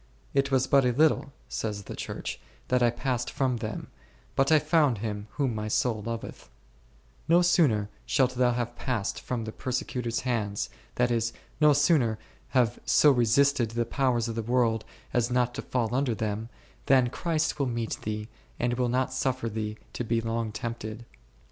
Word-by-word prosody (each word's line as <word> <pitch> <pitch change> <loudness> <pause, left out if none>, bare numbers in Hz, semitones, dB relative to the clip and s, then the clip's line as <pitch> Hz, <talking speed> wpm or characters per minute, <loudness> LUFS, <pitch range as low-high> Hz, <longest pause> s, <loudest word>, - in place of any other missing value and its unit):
It 140 0 +2
was 130 -1 +3
but 140 0 +4
a 125 - +3
little, 150 0 +3 0.2
says 105 -2 -3
the - - -7
Church, - - -5 0.3
that 125 0 +3
I 120 - +5
passed 125 +1 -2
from 130 -4 0
them, 110 -1 -4 0.5
but 135 +3 +3
I 155 - +8
found 150 -5 +3
Him 105 -1 -4
whom 135 -5 0
my 105 0 -3
soul 110 0 +1
loveth; 115 +1 -6 0.8
no 170 +2 +5
sooner 140 - +3 0.2
shalt 130 -1 +2
thou 125 -1 +2
have 120 0 -3
passed 115 -6 -2
from 120 -3 -3
the 110 - -5
per 130 - -6
secutors' 125 -1 -2
hands, 110 -5 -1 0.2
that 125 0 +2
is, 115 0 0 0.3
no 150 -1 +6
sooner 140 -6 +3 0.3
have 120 -3 +2
so 150 - +5
resisted 125 0 +3
the 115 +1 -1
powers 125 -4 +1
of 115 - -3
the 115 - -2
world 115 -1 +1 0.3
as 120 -1 +2
not 125 -1 +1
to - - -4
fall 120 -2 -1
under 130 -3 +1
them, 110 0 -3 0.4
than 130 -2 +4
Christ 160 -1 -1
will 140 - +1
meet 115 -2 -2
thee, 105 0 -4 0.3
and 120 0 +1
will 125 0 0
not 130 +1 0
suffer 130 -2 -1
thee 105 0 -4 0.2
to - - -3
be 115 0 +1
long 115 -1 -2
tempted. 115 0 -5
120 Hz, 180 wpm, -28 LUFS, 115-130 Hz, 0.8 s, I